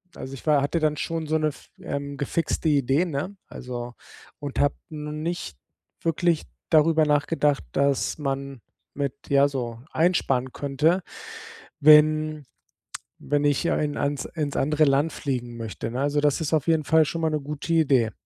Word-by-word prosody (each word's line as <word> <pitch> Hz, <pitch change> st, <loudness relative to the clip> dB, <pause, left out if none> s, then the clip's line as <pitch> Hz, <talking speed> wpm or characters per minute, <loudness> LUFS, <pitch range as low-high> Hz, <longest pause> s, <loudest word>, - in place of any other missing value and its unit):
also 135 Hz, -, -7 dB
ich 130 Hz, -, -13 dB
wa 150 Hz, -3 st, +4 dB
hatte 145 Hz, +4 st, 0 dB
dann 155 Hz, -1 st, +1 dB
schon 165 Hz, +2 st, -3 dB
so 155 Hz, +1 st, +1 dB
‘ne 155 Hz, -, +1 dB
f 150 Hz, -, -8 dB
ähm, 140 Hz, 0 st, -4 dB
gefixte 155 Hz, +3 st, -1 dB
Idee, 140 Hz, +3 st, +2 dB
ne? 170 Hz, +5 st, -4 dB
Also, 120 Hz, -1 st, -7 dB, 0.4 s
und 145 Hz, -2 st, -5 dB
habe 145 Hz, 0 st, +2 dB
no 150 Hz, -1 st, -6 dB
nicht 155 Hz, -, -4 dB, 0.5 s
wirklich 165 Hz, 0 st, +1 dB, 0.3 s
darüber 160 Hz, 0 st, +5 dB
nachgedacht, 145 Hz, -1 st, +1 dB
dass 140 Hz, 0 st, +1 dB
man 135 Hz, -3 st, -4 dB, 0.3 s
mit 140 Hz, -2 st, -2 dB, 0.2 s
ja, 140 Hz, 0 st, +5 dB
so 120 Hz, -4 st, -4 dB
einsparen 135 Hz, -7 st, +1 dB
könnte, 150 Hz, +6 st, +1 dB, 0.8 s
wenn 155 Hz, 0 st, +5 dB, 0.7 s
wenn 145 Hz, 0 st, 0 dB
ich 145 Hz, +3 st, +2 dB
ein 150 Hz, -1 st, -1 dB
ans 140 Hz, -1 st, -1 dB
ins 150 Hz, -4 st, -4 dB
andere 150 Hz, +2 st, +3 dB
Land 145 Hz, +3 st, +2 dB
fliegen 120 Hz, -4 st, -4 dB
möchte, 115 Hz, 0 st, -5 dB
ne, 125 Hz, -, -3 dB
also 145 Hz, +1 st, +1 dB
das 145 Hz, +2 st, +2 dB
ist 160 Hz, 0 st, -2 dB
auf 155 Hz, -3 st, +2 dB
jeden 160 Hz, -2 st, +2 dB
Fall 160 Hz, +1 st, +4 dB
schon 165 Hz, +3 st, -4 dB
mal 160 Hz, -, +2 dB
‘ne 150 Hz, -, 0 dB
gute 150 Hz, +3 st, -4 dB
Idee. 135 Hz, -8 st, +3 dB
145 Hz, 165 wpm, -25 LUFS, 140-155 Hz, 0.8 s, darüber